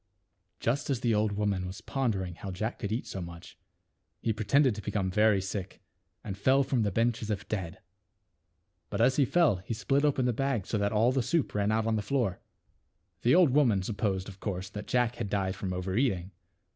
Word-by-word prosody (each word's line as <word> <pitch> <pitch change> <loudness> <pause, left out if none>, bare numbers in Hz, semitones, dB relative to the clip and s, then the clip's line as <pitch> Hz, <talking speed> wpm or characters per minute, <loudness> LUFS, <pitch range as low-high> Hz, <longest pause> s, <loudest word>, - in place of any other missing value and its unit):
Just 140 +6 -1
as 135 -4 0
the 120 -2 +2
old 105 0 +1
woman 100 -3 -1
was 95 +4 -7
Jj 115 - -15
wondering 100 -9 0
how 95 +3 -7
Jack 110 +5 -3
could 100 - -3
eat 115 +4 -2
so 95 - -5
much, 85 0 -9 0.6
he 115 - 0
pretended 120 +5 +3
to 105 - -6
become 95 -2 -1
very 105 0 +4
sick 95 0 -5 0.4
and 100 -3 -5
fell 130 +7 +3
from 130 -2 0
the 105 - +2
bench 115 +3 +1
as 110 - -5
if 105 -3 -3
dead. 95 -6 -3 1.1
But - - -3
as 125 +3 +4
he 140 - +5
fell 155 - +3
he 100 +5 -5
slit 135 +6 +1
open 135 -4 +2
the 125 - +2
bag 130 -4 -1
so 105 - -1
that 100 0 +1
all 110 +3 +3
the 130 0 +1
soup 155 +5 0
ran 105 0 +1
out 110 0 +1
on 110 -1 +1
the - - 0
floor. 115 -5 -1 0.8
The 125 - +4
old 175 -6 +6
woman 120 -9 +3
supposed 100 -2 -1
of 95 -1 -10
course 95 -1 -4
that 105 0 -7
Jack 120 -1 +1
had 115 -4 -3
died 95 -2 -1
from 95 0 -4
over 90 +1 -3
eating. 100 -7 0
105 Hz, 215 wpm, -29 LUFS, 95-125 Hz, 1.1 s, old